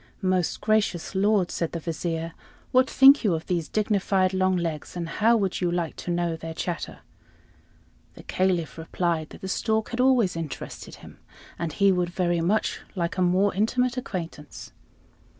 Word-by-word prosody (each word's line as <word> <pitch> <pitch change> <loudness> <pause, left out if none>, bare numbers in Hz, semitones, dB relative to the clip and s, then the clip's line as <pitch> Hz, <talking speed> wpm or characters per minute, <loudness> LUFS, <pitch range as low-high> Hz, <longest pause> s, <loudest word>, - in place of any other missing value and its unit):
"Most 185 -2 0
gracious 210 -6 0
lord," 200 -1 +2
said 170 - -2
the 170 - -2
Vizier, 165 0 -3 0.4
"what 255 +1 +4
think 270 +1 +7
you 195 -6 +2
of 160 - -5
these 170 -3 -1
dignified 195 -3 +1
long 185 0 +2
legs, 165 -3 -4
and 170 -1 -3
how 225 +7 +3
would 195 -4 -1
you 175 -1 +1
like 170 -2 -2
to - - -6
know 175 -1 0
their 160 0 -7
chatter?" 170 -1 -4 1.1
The - - -12
Caliph 175 -6 -1
replied 165 -1 -2
that - - -13
the 190 - -5
stork 220 +3 0
had 240 - -5
always 250 -9 +3
interested 165 -3 -6
him, - - -14 0.4
and 165 -2 -2
he 200 +5 +3
would 180 -2 0
very 175 -1 0
much 200 +6 0
like 170 +1 -2
a - - +2
more 185 +3 +3
intimate 240 +5 +1
acquaintance. 170 - -6
180 Hz, 170 wpm, -25 LUFS, 170-205 Hz, 1.1 s, think